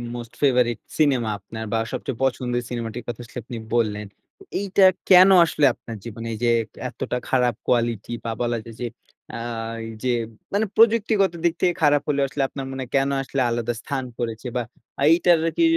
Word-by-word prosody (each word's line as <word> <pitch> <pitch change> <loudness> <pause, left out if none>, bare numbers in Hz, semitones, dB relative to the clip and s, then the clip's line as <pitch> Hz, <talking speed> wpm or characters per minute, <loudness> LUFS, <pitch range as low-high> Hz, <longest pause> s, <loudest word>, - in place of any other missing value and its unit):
most 120 -1 -8
favorite 125 -4 +3 0.2
cinema 130 -7 +3
আপনার 110 +3 -8
বা - - +3
সবচেয়ে 130 -4 -4
পছন্দের 125 -1 0
সিনেমাটির 120 0 -4
কথা 120 0 -5
আসলে 105 - -12
আপনি 120 0 -7 0.2
বললেন। 105 -3 0 0.3
তো - - -14 0.2
এইটা 195 0 +2 0.3
কেন 185 +1 +9 0.2
আসলে 150 -3 +1
আপনার 115 - -9
জীবনে 115 0 -7
এই - - -5
যে, 120 - +4 0.4
এতটা 125 - -3
খারাপ 125 -3 +2
quality 120 -3 0
বা 115 - -3
বলা 120 -1 0
যায় 115 -1 -11
যে, - - -1 0.5
অ্যা - - -6 0.7
যে, 130 - +1 0.4
মানে 215 +2 +2
প্রযুক্তিগত 220 -4 +4
দিক 170 -1 +3
থেকে 180 -1 +3
খারাপ 145 -1 +4
হলেও 140 -1 +2
আসলে 145 -2 -1
আপনার 135 -1 -6
মনে 135 0 -5
হয় 125 - -12
কেন 135 0 +3
আসলে 135 0 -2
আলাদা 120 0 -1
স্থান 135 -1 -3 0.2
করেছে 115 +1 -3
বা 120 - 0 0.5
এইটার 170 0 +5 0.2
কি 335 - +4
125 Hz, 180 wpm, -23 LUFS, 115-145 Hz, 0.7 s, কেন